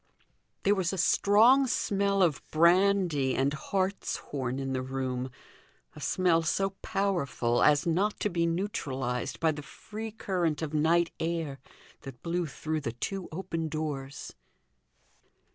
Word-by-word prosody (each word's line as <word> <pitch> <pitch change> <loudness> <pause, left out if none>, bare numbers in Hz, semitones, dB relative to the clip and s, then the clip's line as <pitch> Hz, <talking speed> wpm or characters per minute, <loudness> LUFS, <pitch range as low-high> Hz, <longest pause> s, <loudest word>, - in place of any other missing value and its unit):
There 200 - +4
was 190 -4 0
a 190 - -4
strong 225 +9 +5
smell 200 -3 +1
of 160 -6 +1
brandy 170 -4 +3
and 135 +2 +1
hartshorn 150 -8 -2
in 135 -1 -3
the 130 - -1
room; 130 -1 -3 0.7
a - - -10
smell 175 -3 +2
so 195 +4 0
powerful 175 - 0
as 145 -1 +4
not 190 +5 +1
to 210 - +1
be 170 -1 +1
neutralized 135 - -2
by 160 -1 +3
the 150 -1 -6
free 215 +10 -8
current 175 -7 -1
of 155 -1 -4
night 165 +3 +3
air 160 -4 -2 0.4
that 135 -3 -10
blew 170 0 -1
through 155 +2 -3
the 115 -5 -3
two 190 +10 -4
open 165 -1 -3
doors. 145 -3 -5
165 Hz, 135 wpm, -29 LUFS, 140-195 Hz, 0.7 s, strong